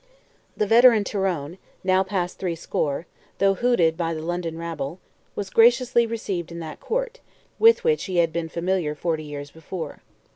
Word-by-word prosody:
The 210 - +2
veteran 230 0 +6
Tyrone, 185 -5 -2 0.2
now 185 0 +3
past 190 -2 -2
threescore, 165 -4 -2 0.3
though 195 0 +3
hooted 195 -8 +2
by 165 -1 -2
the 155 - -5
London 170 -1 -3
rabble, 165 -2 -5 0.4
was 200 -2 -4
graciously 235 +1 +4
received 195 -7 -4
in 170 - -7
that 160 -2 -7
court, - - -3 0.4
with 455 +2 +6
which 465 -1 +1
he 185 -2 -3
had 165 -2 +3
been 170 -1 -2
familiar 170 -2 -1
forty 160 0 -2
years 145 -1 -7
before. 160 -1 -7
180 Hz, 155 wpm, -24 LUFS, 160-215 Hz, 0.4 s, veteran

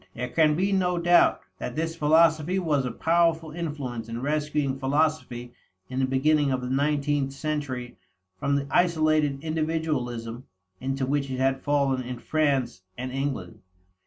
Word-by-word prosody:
There 125 - -3
can 155 +1 +3
be 190 +4 +1
no 180 -2 +1
doubt 175 +1 +4 0.2
that 125 - -5
this 165 +1 -2
philosophy 160 +2 +3
was 150 -7 +1
a - - -3
powerful 165 -1 +1
influence 145 -8 -5
in 115 +1 -4
rescuing 145 -1 -1
philosophy 135 -4 -1 0.4
in 130 - -3
the 130 - +2
beginning 145 +2 +2
of 130 -1 0
the 125 0 -4
nineteenth 145 0 +1
century 140 -4 -4 0.4
from 140 +6 +1
the 140 0 0
isolated 155 -5 +2
individualism 150 -7 -2 0.3
into 135 0 -2
which 140 0 -1
it 130 - -3
had 135 0 +1
fallen 140 -3 +1
in 125 0 -6
France 140 -9 0 0.2
and 130 +1 -4
England. 135 -9 -3
145 Hz, 150 wpm, -26 LUFS, 130-155 Hz, 0.4 s, doubt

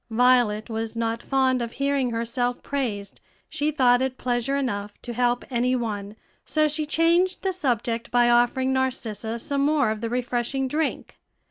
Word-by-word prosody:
Violet 235 -2 +3
was 225 0 -4
not 230 0 -1
fond 260 -2 +1
of 235 -1 -4
hearing 275 -2 0
herself 235 +1 -2
praised; 220 -8 -3 0.3
she 295 +1 -1
thought 250 -4 +3
it 260 -1 -1
pleasure 245 +2 -1
enough 205 -7 -3
to 240 - -5
help 245 0 +1
any 250 +1 +1
one; 210 -4 -4 0.3
so 310 0 +2
she 300 0 -2
changed 340 +4 +2
the 380 -1 0
subject 235 - -1
by 240 0 +4
offering 245 +2 +3
Narcissa 235 -4 -2
some 280 +4 -2
more 285 -4 +2
of 215 -1 -4
the 230 - -2
refreshing 245 +2 -1
drink. 305 +4 -3
245 Hz, 160 wpm, -25 LUFS, 230-275 Hz, 0.3 s, by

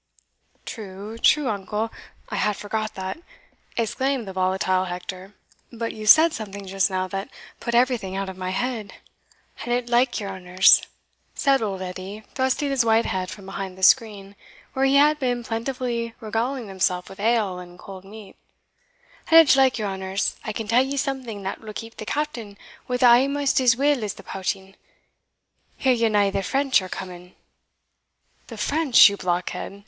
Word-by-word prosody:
"True, 210 +1 -8
true, 295 +3 +4
uncle 210 +1 -2 0.4
I - - -3
had 210 -1 0
forgot 215 +1 -4
that," 190 +9 -5 0.6
exclaimed 240 +1 -1
the 190 - -6
volatile 185 0 +1
Hector; 185 +2 -7 0.4
"but 230 -1 -4
you 215 -1 -7
said 320 +7 +7
something 200 -4 -7
just 195 +1 +1
now 185 -1 -2
that 195 +1 -4 0.3
put 235 -1 -3
everything 240 -6 +1
out 195 0 -2
of 190 - -7
my 185 0 -4
head." 220 +1 -3 0.7
"An 240 - -4
it 245 0 -1
like 240 +1 +2
your 200 -2 -5
honours," 185 0 +5 0.5
said 275 -2 +2
old 195 -3 -3
Edie, 185 +3 -7
thrusting 260 +2 0
his 265 -3 +2
white 225 0 +3
head 185 -1 -2
from 200 - -10
behind 195 -1 -6
the 190 - -10
screen, 205 -3 +3 0.4
where 265 0 +1
he 270 +1 +3
had 300 +2 +5
been 245 -3 -1
plentifully 235 0 -3
regaling 230 +2 -2
himself 185 -2 -1
with 195 - -12
ale 210 -4 +1
and 175 0 -12
cold 190 0 -11
meat 205 0 -12 0.9
"an 325 - +7
it 320 -4 +8
like 265 -2 +4
your 215 -2 -2
honours, 190 +1 -2
I 215 - -4
can 215 0 -5
tell 235 +4 +4
ye 270 +2 -2
something 260 -7 -3
that 190 - -5
will 215 -1 -9
keep 225 +2 -8
the 215 - -8
Captain 235 -9 -3 0.3
wi' 250 - -1
us 250 - -1
amaist 270 +3 +4
as 240 -2 +4
weel 280 -3 +2
as 205 -2 -3
the - - -13
pouting 195 0 -4 1.0
Hear 260 -1 +3
ye 230 -2 +2
na 205 -2 +2
the 195 0 -1
French 265 +4 +2
are 185 - -8
coming?" 180 -1 -8 1.1
"The - - -9
French, 295 -4 +5
you 200 - -1
blockhead?" 180 +2 -3
215 Hz, 175 wpm, -23 LUFS, 190-250 Hz, 1.1 s, it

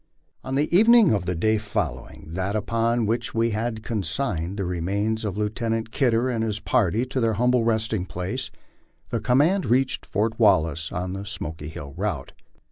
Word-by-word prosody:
ON 130 0 -3
the 150 +4 +1
evening 225 - +7
of 100 -3 -1
the 90 - 0
day 110 +6 +2
following 80 -7 -4
that 95 +3 -2
upon 115 +2 +1
which 115 +3 -2
we 115 +1 +2
had 110 +1 -2
consigned 100 - -2
the 100 - -1
remains 100 +6 -1
of 105 -2 -3
Lieutenant 110 +1 -2
Kidder 120 -2 +2
and 115 -3 -1
his 110 -1 -2
party 110 +3 +1
to 130 +1 -3
their 115 -2 +2
humble 125 +2 +2
resting 110 -4 0
place, 95 +10 -4 0.6
the 115 - 0
command 145 - +2
reached 130 +2 +1
Fort 110 +3 -1
Wallace 80 -7 +3
on 90 +1 -3
the 95 +1 -5
Smoky 80 -7 -6
Hill 75 -2 -8
route. 90 -7 -3
110 Hz, 170 wpm, -24 LUFS, 95-120 Hz, 0.6 s, evening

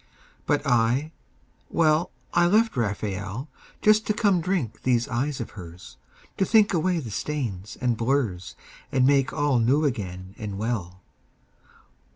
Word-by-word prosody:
But 145 0 +1
I, 125 +4 +2 0.6
well, 160 +1 +2 0.2
I 175 0 +4
left 220 +5 +3
Raphael 105 +2 -3 0.3
Just 215 +1 +4
to 215 - +1
come 200 -5 +2
drink 160 - -2
these 120 -2 +1
eyes 130 +4 -2
of 115 - -5
hers, 90 -3 -11 0.4
To - - +2
think 210 0 +4
away 175 +1 +1
the 125 -9 -5
stains 110 -8 -4
and 125 -2 +1
blurs 115 -7 -1 0.4
And 130 -1 +3
make 140 -1 +3
all 145 -4 +1
new 135 +7 +3
again 95 -7 -4
and 105 -2 -5
well. 95 -5 -3
130 Hz, 140 wpm, -25 LUFS, 105-155 Hz, 0.6 s, I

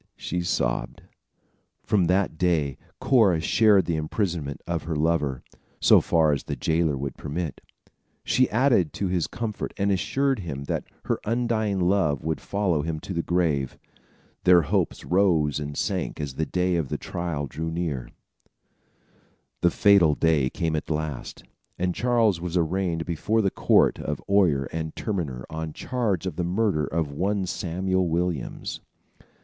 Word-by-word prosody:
she 90 +1 -3
sobbed. 65 -7 -1 0.8
From 105 -4 +2
that 95 0 +1
day, 80 -6 0 0.2
Cora 110 -11 +4
shared 100 +2 +4
the 80 -1 -1
imprisonment 80 -3 -2
of 85 -2 -2
her 80 -1 -2
lover, 75 -4 0 0.4
so - - +6
far 80 -2 +3
as 70 - -3
the - - -3
jailer 80 -3 +1
would 70 0 -4
permit. 75 -1 -4 0.6
She 130 0 +2
added 115 - +2
to 95 - -2
his 90 -3 0
comfort 110 -3 -5
and 100 0 +1
assured 135 +7 +1
him 70 -7 -5
that - - -3 0.2
her - - 0
undying 110 -3 0
love 90 -6 +1
would 80 0 -2
follow 95 -7 0
him 80 0 -3
to 95 - -6
the 85 - 0
grave. 80 -7 0 0.7
Their 90 -2 +6
hopes - - -1
rose 85 -6 +2
and 75 -1 -5
sank - - -2
as 75 -3 -4
the 80 +4 -2
day 90 -1 +1
of 80 -6 -2
trial 85 -4 -3
drew 80 +4 -4
near. 80 -7 -3 1.5
The 85 - +4
fatal 90 -5 +5
day 75 -5 +2
came 80 +2 -2
at 75 - -4
last, 75 -4 -4 0.3
and 90 0 0
Charles 115 -5 +2
was 90 0 -2
arraigned 85 -1 0
before 105 +6 0
the 95 - +1
court - - +3
of - - -3
oyer 90 -9 +3
and 80 -1 -4
terminer 75 - -3
on 80 -1 -4
charge 110 -9 -1
of 95 - -4
the 90 - 0
murder 90 -4 0
of 80 -3 -2
one 95 +6 -1
Samuel 95 0 -1
Williams. 85 -4 -2
85 Hz, 155 wpm, -25 LUFS, 75-95 Hz, 1.5 s, so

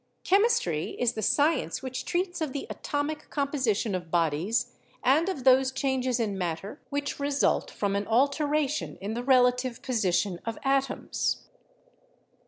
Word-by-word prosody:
"Chemistry 385 - +2
is 245 -1 +2
the 220 - -4
science 275 - +1
which 260 -1 -4
treats 355 0 -1
of 300 -4 -2
the 280 - -4
atomic 295 +1 -3
composition 260 -7 0
of 175 -2 -4
bodies 170 +6 0 0.3
and 310 +8 +3
of 290 -9 -4
those 260 0 +5
changes 260 -2 0
in 205 -4 -1
matter 180 - -4
which 285 0 -3
result 285 0 +1
from 200 -1 -2
an 200 0 -1
alteration 285 +4 +1
in 205 +3 -4
the 240 +2 -3
relative 250 -1 +3
position 190 -6 0
of 230 0 -4
atoms." 275 0 0
255 Hz, 140 wpm, -28 LUFS, 205-285 Hz, 0.3 s, those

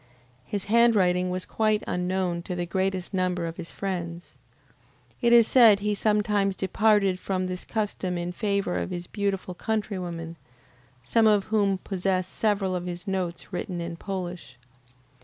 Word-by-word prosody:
His 200 +4 -3
handwriting 200 -5 +3
was 185 0 -3
quite 215 -1 +1
unknown 180 -1 -1
to 180 +1 -5
the 175 0 -2
greatest 190 +1 -2
number 180 -2 0
of 165 0 -5
his 170 -2 -7
friends. 175 -3 -5 0.8
It 235 -2 +3
is 235 -1 +8
said 225 -6 +6
he 210 0 0
sometimes 205 -2 +1
departed 195 0 +2
from 185 -1 -2
this 185 0 -4
custom 200 -4 -2
in 175 +1 -3
favor 200 -1 -1
of - - -3
his 175 -1 -5
beautiful 195 -2 -2
countrywomen, 180 -6 -3 0.7
some 225 - +3
of 210 -2 +4
whom 200 -3 +3
possess 185 -1 -1
several 195 -2 0
of 180 0 -4
his 175 +3 -6
notes 185 -1 -3
written 180 0 -3
in 170 0 -4
Polish. 180 -7 -6
190 Hz, 150 wpm, -26 LUFS, 180-205 Hz, 0.8 s, is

